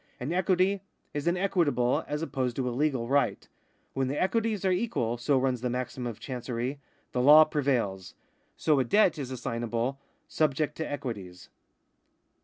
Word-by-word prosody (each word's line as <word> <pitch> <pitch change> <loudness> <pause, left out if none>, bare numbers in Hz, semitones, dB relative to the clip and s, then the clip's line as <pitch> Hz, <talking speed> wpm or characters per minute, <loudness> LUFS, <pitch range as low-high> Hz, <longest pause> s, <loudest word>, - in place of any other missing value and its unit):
An 135 +7 -3
equity 185 +1 +2 0.3
is 145 +2 -3
an 175 +1 +2
equitable, 165 -10 +1
as 150 +2 -3
opposed 130 -6 -2
to 130 -2 -1
a - - -1
legal 130 -2 0
right. 140 +2 +1 0.2
" - - -41
When 135 -1 0
the 140 +3 -2
equities 215 0 0
are 190 - +3
equal," 180 - -1
so 135 +3 +2
runs 130 -2 0
the 125 - -1
maxim 125 0 -3
of 115 -3 -6
Chancery, 125 +1 -4 0.2
" - - -39
the 125 - 0
law 150 +4 +9
prevails." 120 - -1 0.4
So 150 -3 +2
a - - +3
debt 185 - +3
is 135 -3 -4
assignable 120 +1 -3 0.2
" - - -44
subject 150 -1 +1
to 160 - -4
equities." 110 - -6
135 Hz, 175 wpm, -28 LUFS, 125-155 Hz, 0.4 s, law